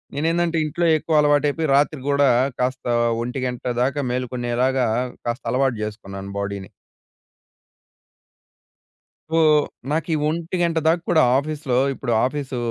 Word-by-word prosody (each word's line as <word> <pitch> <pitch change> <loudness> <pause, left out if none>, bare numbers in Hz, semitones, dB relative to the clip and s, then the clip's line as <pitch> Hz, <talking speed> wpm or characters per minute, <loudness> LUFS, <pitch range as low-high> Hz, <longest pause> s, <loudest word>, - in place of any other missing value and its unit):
నేనేందంటే 165 +3 0
ఇంట్లో 170 +3 -1
ఎక్కువ 155 0 +1
అలవాటయిపోయి 145 +2 +2
రాత్రి 145 +1 +2
గూడా 140 -1 +4 0.3
కాస్త 130 +1 -2 0.4
1:00 125 0 -4 0.2
దాకా 135 +3 0
మేలుకునేలాగా 125 +1 0 0.4
కాస్త 120 +3 -3
అలవాటు 130 0 +1
జేసుకున్నాను 100 -2 -7
బాడీని. 100 -1 -4 2.6
సో, 165 - +1 0.5
నాకు 155 0 -1
ఈ - - +2
1:00 170 +1 -1
దాక 165 +2 +3
కూడా 160 -2 +5 0.2
ఆఫీస్‌లో 145 -3 -2 0.2
ఇప్పుడు 130 -2 -4
ఆఫీసు 135 -1 -3
140 Hz, 110 wpm, -22 LUFS, 125-155 Hz, 2.6 s, కూడా